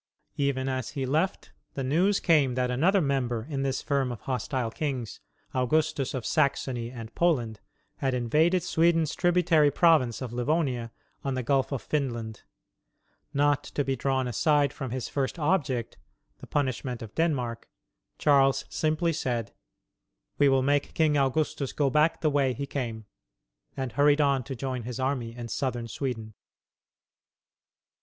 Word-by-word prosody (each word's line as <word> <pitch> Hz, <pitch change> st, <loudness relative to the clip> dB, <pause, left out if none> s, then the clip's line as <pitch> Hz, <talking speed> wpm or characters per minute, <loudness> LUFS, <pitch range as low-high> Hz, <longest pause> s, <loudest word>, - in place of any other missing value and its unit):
Even 140 Hz, -2 st, 0 dB
as 130 Hz, -3 st, -2 dB
he 135 Hz, -, 0 dB
left, 155 Hz, +8 st, -1 dB, 0.2 s
the 135 Hz, -, -2 dB
news 175 Hz, +10 st, +2 dB
came 145 Hz, -7 st, +3 dB
that 125 Hz, -1 st, 0 dB
another 180 Hz, +10 st, +3 dB
member 125 Hz, -6 st, -1 dB
in 140 Hz, -3 st, -3 dB
this 135 Hz, -1 st, -1 dB
firm 135 Hz, -3 st, 0 dB
of 115 Hz, -3 st, -7 dB
hostile 125 Hz, -2 st, -2 dB
kings, 130 Hz, -6 st, -4 dB, 0.3 s
Augustus 135 Hz, +1 st, 0 dB
of 125 Hz, -4 st, -4 dB
Saxony 130 Hz, -5 st, 0 dB
and 115 Hz, -2 st, -9 dB
Poland, 120 Hz, -11 st, +1 dB, 0.4 s
had 135 Hz, -2 st, 0 dB
invaded 155 Hz, +9 st, +2 dB
Sweden's 165 Hz, -1 st, +2 dB
tributary 175 Hz, -4 st, +3 dB
province 145 Hz, -6 st, +3 dB
of 125 Hz, -3 st, -6 dB
Livonia 125 Hz, -2 st, 0 dB, 0.3 s
on 135 Hz, -1 st, -1 dB
the 130 Hz, -, -2 dB
Gulf 135 Hz, +3 st, +1 dB
of 135 Hz, -, -3 dB
Finland. 120 Hz, -7 st, -3 dB, 0.9 s
Not 145 Hz, 0 st, +2 dB
to 145 Hz, -, -2 dB
be 135 Hz, 0 st, -1 dB
drawn 130 Hz, 0 st, 0 dB
aside 145 Hz, +3 st, +2 dB
from 130 Hz, -, -5 dB
his 125 Hz, +1 st, -3 dB
first 135 Hz, +3 st, -2 dB
object 145 Hz, -8 st, 0 dB, 0.4 s
the -, -, -11 dB
punishment 130 Hz, -3 st, -2 dB
of 110 Hz, -, -10 dB
Denmark 125 Hz, -8 st, -1 dB, 0.5 s
Charles 135 Hz, -2 st, +3 dB
simply 155 Hz, +2 st, 0 dB
said, 120 Hz, -9 st, -2 dB, 0.9 s
"We 145 Hz, -1 st, +6 dB
will 135 Hz, -1 st, +3 dB
make 145 Hz, +1 st, +1 dB
King 155 Hz, -2 st, +3 dB
Augustus 140 Hz, 0 st, 0 dB
go 140 Hz, -2 st, +1 dB
back 155 Hz, +3 st, +2 dB
the 155 Hz, -, +2 dB
way 140 Hz, -3 st, +2 dB
he 140 Hz, +4 st, -4 dB
came," 115 Hz, -6 st, -4 dB, 0.7 s
and 130 Hz, -2 st, -3 dB
hurried 145 Hz, +4 st, +4 dB
on 140 Hz, -3 st, +2 dB
to 135 Hz, -, -5 dB
join 130 Hz, 0 st, -3 dB
his 120 Hz, +1 st, -6 dB
army 130 Hz, -3 st, -2 dB
in 120 Hz, -1 st, -6 dB
southern 120 Hz, 0 st, -2 dB
Sweden. 115 Hz, -3 st, -4 dB
135 Hz, 150 wpm, -27 LUFS, 125-150 Hz, 0.9 s, We